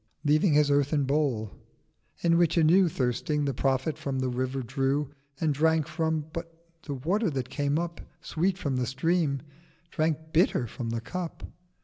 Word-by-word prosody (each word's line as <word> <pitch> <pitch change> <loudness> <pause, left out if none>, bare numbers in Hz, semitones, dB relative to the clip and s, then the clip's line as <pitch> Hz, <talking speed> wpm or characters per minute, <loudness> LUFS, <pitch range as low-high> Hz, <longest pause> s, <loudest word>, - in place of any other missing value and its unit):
Leaving 155 +3 +4
his 145 -1 +4
earthen 145 +1 +2
Bowl. 135 -7 0 0.7
In 170 -1 +3
which, 170 -1 +3
anew 165 +2 +6
970 165 - -4
Thirsting, 150 +4 -1
the 140 - 0
Prophet 135 +4 0
from 135 -2 -3
the 130 0 0
River 130 +1 -2
drew, 135 +3 -1 0.3
And 155 -2 +1
drank 160 +1 +2
from: 160 -1 -1
but 165 0 -5 0.3
the 145 - -5
Water 185 - 0
that 130 -4 -3
came 145 +2 0
up 170 0 -3 0.2
Sweet 180 +3 -1
from 140 -8 -2
the 125 -1 0
Stream. 140 +1 0 0.5
drank 160 0 -1
bitter 160 -6 +3
from 115 +1 -5
the 115 0 -2
Cup. 175 +7 -5
150 Hz, 165 wpm, -28 LUFS, 135-160 Hz, 0.7 s, anew